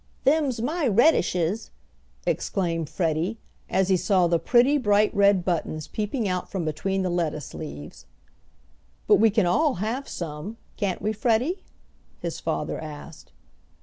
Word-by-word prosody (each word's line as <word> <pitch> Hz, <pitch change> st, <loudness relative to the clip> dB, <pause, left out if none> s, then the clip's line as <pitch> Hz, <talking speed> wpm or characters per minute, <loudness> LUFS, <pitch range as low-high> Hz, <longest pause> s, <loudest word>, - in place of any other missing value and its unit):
"Them's 280 Hz, -4 st, +2 dB
my 290 Hz, +4 st, 0 dB
redishes!" 200 Hz, -, +2 dB, 0.6 s
exclaimed 165 Hz, -5 st, -1 dB
Freddie, 170 Hz, +5 st, -1 dB, 0.3 s
as 190 Hz, +1 st, +1 dB
he 190 Hz, -, +4 dB
saw 185 Hz, 0 st, +3 dB
the 170 Hz, -1 st, +2 dB
pretty 255 Hz, -, +4 dB
bright 210 Hz, -3 st, +3 dB
red 200 Hz, -3 st, +4 dB
buttons 155 Hz, -3 st, -2 dB
peeping 215 Hz, +2 st, -2 dB
out 180 Hz, -1 st, -2 dB
from 185 Hz, -4 st, -3 dB
between 190 Hz, +5 st, -1 dB
the 185 Hz, -, 0 dB
lettuce 155 Hz, -5 st, -2 dB
leaves. 75 Hz, -, -8 dB, 1.0 s
"But -, -, +6 dB
we 225 Hz, +1 st, +5 dB
can 210 Hz, -2 st, +2 dB
all 290 Hz, -, +2 dB
have 225 Hz, +9 st, -3 dB
some, 170 Hz, +6 st, -6 dB, 0.2 s
can't 195 Hz, -4 st, -2 dB
we, 215 Hz, +1 st, 0 dB
Freddie?" 245 Hz, -, +1 dB, 0.6 s
his -, -, -4 dB
father -, -, -2 dB
asked. 150 Hz, 0 st, -10 dB
195 Hz, 140 wpm, -25 LUFS, 170-230 Hz, 1.0 s, But